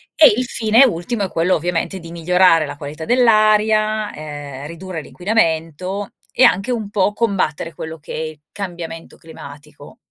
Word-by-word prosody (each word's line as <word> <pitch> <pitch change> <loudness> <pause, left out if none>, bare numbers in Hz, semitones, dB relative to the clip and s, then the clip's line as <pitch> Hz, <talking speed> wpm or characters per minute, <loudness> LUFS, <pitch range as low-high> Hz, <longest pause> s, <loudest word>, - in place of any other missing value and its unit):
e 305 -8 +7
il 250 - 0
fine 230 +3 +4
ultimo 205 +1 -2
è 190 - -2
quello 170 +3 +2
ovviamente 175 +3 -2
di 165 0 -11
migliorare 170 -1 +3
la 145 - -7
qualità 150 +2 -7
dell'aria, 215 -2 +3
ehm, 145 -2 -8
ridurre 170 0 -7
l'inquinamento 180 0 -1 0.2
e 260 - +2
anche 195 +7 +4
un 220 -4 -3
po' 205 0 +1
combattere 185 -8 -1
quello 160 +1 -7
che - - -9
è - - -4
il 155 -1 -6
cambiamento 170 -4 -7
climatico. 145 -2 -13
175 Hz, 155 wpm, -19 LUFS, 160-215 Hz, 0.2 s, e